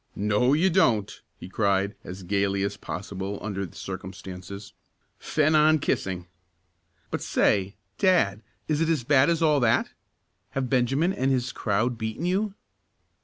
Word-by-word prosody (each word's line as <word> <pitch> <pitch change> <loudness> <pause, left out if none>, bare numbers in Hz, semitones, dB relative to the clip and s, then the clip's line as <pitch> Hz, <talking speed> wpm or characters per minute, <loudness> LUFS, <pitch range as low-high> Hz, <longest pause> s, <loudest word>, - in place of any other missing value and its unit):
"No, 105 +6 +2
you 175 +5 +3
don't!" 115 - +2 0.2
he - - -9
cried 100 0 +1
as 95 +1 -8
gaily 100 +1 0
as 100 0 -2
possible 100 +1 -5
under 100 -2 -4
the - - -18
circumstances, 95 +1 -8 0.5
"fen 155 0 +1
on 155 +1 +5
kissing. 95 - -2 0.9
But - - -2
say, 100 -1 +1 0.2
dad, 110 - +3 0.3
is 155 0 0
it 165 - +2
as 155 -7 +1
bad 135 +3 +4
as 170 -1 +1
all 150 -2 +4
that? 120 -3 +2 0.7
Have 130 -1 -1
Benjamin 135 +8 +2
and 130 -4 0
his 125 -2 0
crowd 115 +3 -1
beaten 110 +8 -3
you?" 195 +3 0
110 Hz, 145 wpm, -26 LUFS, 100-150 Hz, 0.9 s, on